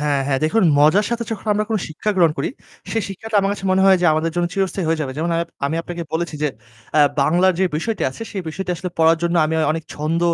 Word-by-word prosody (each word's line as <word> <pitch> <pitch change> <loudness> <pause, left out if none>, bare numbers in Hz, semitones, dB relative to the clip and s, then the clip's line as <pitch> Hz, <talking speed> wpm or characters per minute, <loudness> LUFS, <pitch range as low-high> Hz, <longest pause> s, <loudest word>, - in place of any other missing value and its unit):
হ্যাঁ, 145 -2 +1
হ্যাঁ। 135 -1 +1
দেখুন 220 +9 +2 0.2
মজার 155 +8 +5
সাথে 235 0 -1
যখন 220 -1 -5
আমরা 210 +1 0 0.2
শিক্ষা 155 +7 -2
গ্রহণ 170 -4 +4
করি, - - 0 0.4
সেই 225 - 0
শিক্ষাটা 215 +3 -4
আমার 195 0 0
কাছে 200 -1 -7
মনে 190 0 +3
হয় 190 - +7
যে 180 - +3
আমাদের 160 +2 0
জন্য 175 0 +1
চিরস্থায়ী 195 -2 -1
হয়ে 165 -1 0
যাবে। 135 -3 -3
যেমন 165 +3 -1
আম - - +1 0.3
আমি 155 +3 -2
আপনাকে 175 0 -6
বলেছি 165 0 -2
যে 150 - +2 0.5
অ্যা 155 - +5 0.2
বাংলার 175 +6 +3
যে - - +4
বিষয়টি 220 +7 -2
আছে 135 - -9
সে 205 - -5
বিষটি 180 +4 -4
আসলে 180 +2 -5
পড়ার 165 0 +4
জন্য 170 0 +1
আমি 160 - -2 0.2
অনেক 160 0 -4
ছন্দ 155 +3 -1
170 Hz, 240 wpm, -20 LUFS, 155-195 Hz, 0.5 s, হয়